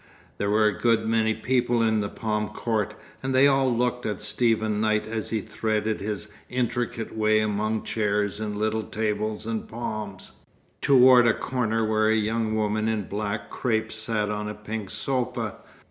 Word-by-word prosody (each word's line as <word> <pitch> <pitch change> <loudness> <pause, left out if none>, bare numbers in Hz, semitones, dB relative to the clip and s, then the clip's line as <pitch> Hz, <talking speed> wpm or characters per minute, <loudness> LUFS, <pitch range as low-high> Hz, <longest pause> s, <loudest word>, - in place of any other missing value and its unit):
There 100 - 0
were 105 +1 +4
a 105 - +1
good 115 -2 +2
many 110 -1 +2
people 120 -2 +1
in 110 -1 +2
the 100 - -2
Palm 105 -1 -2
Court, 105 -1 -2 0.3
and 130 0 -1
they 130 +2 +6
all 135 -2 +4
looked 125 +1 0
at 105 -3 -3
Stephen 110 -1 0
Knight 110 0 +1
as 110 -1 -3
he 110 -2 -1
threaded 110 0 -1
his 105 0 -4 0.2
intricate 120 -1 -2
way 110 0 +3
among 110 +1 0
chairs 105 -1 0
and 105 -1 -3
little 110 +1 0
tables 110 0 -2
and 115 -1 -3
palms, 110 -4 -5 0.5
toward 125 -2 +7
a 115 - +4
corner 115 -3 -1
where 110 0 +2
a 110 - +4
young 110 0 0
woman 110 0 0
in 110 -2 0
black 105 +2 -4
crape 110 -2 -1
sat 110 -1 -1
on 105 0 -3
a 105 - -5
pink 105 -1 -5
sofa. 125 -5 -2
110 Hz, 170 wpm, -26 LUFS, 105-115 Hz, 0.5 s, toward